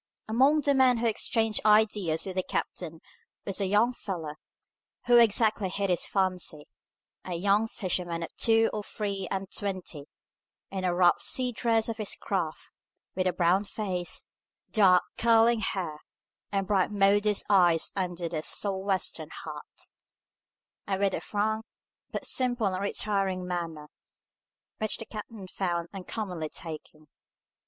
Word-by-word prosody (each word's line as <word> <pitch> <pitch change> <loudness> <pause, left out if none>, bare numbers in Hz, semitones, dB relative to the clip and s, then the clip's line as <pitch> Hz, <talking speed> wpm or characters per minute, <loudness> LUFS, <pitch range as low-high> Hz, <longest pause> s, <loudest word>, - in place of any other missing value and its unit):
Among 270 +7 +4
the 285 0 +2
men 260 -2 +4
who 235 - -1
exchanged 225 -1 0
ideas 210 -6 +3
with 190 -2 -5
the 185 - +2
captain 165 -2 -4 0.4
was 195 0 -1
a 195 - +1
young 210 +6 +3
fellow, 170 -10 -5 0.7
who 240 0 +6
exactly 220 -3 +4
hit 195 0 -1
his 175 - 0
fancy, 185 -6 -1 0.6
a 180 - -4
young 200 +5 +2
fisherman 175 -5 -2
of - - -8
two 225 0 +3
or 215 - -2
three 200 -2 -4
and 195 0 -3
twenty, 185 -7 -4 0.7
in 190 -1 -3
the 180 -1 0
rough 175 -1 +4
sea 250 -1 +1
dress 225 -1 +1
of 230 0 -3
his 215 -3 0
craft, 170 -6 -3 0.4
with 185 0 0
a - - +3
brown 180 +2 +2
face, 190 -4 -3 0.5
dark 185 -5 +5 0.2
curling 230 0 +5
hair, 175 -8 -2 0.5
and 195 -1 0
bright, 190 -2 +2
modest 205 +1 +3
eyes 175 -5 +4
under 180 -2 -3
his 160 -2 -3
Sou'wester 195 -1 -1 0.2
hat, - - -8 1.0
and 195 -1 -1
with 195 -1 +2
a - - -2
frank, 220 +1 -1 0.5
but - - -5
simple 245 -3 0
and 185 - -2
retiring 195 -2 -1
manner, 165 -4 -4 0.9
which 215 -1 0
the 225 - -8
captain 215 -2 -8
found 175 -3 -2
uncommonly 185 -4 -4
taking. 155 -1 -8
195 Hz, 140 wpm, -28 LUFS, 180-215 Hz, 1.0 s, who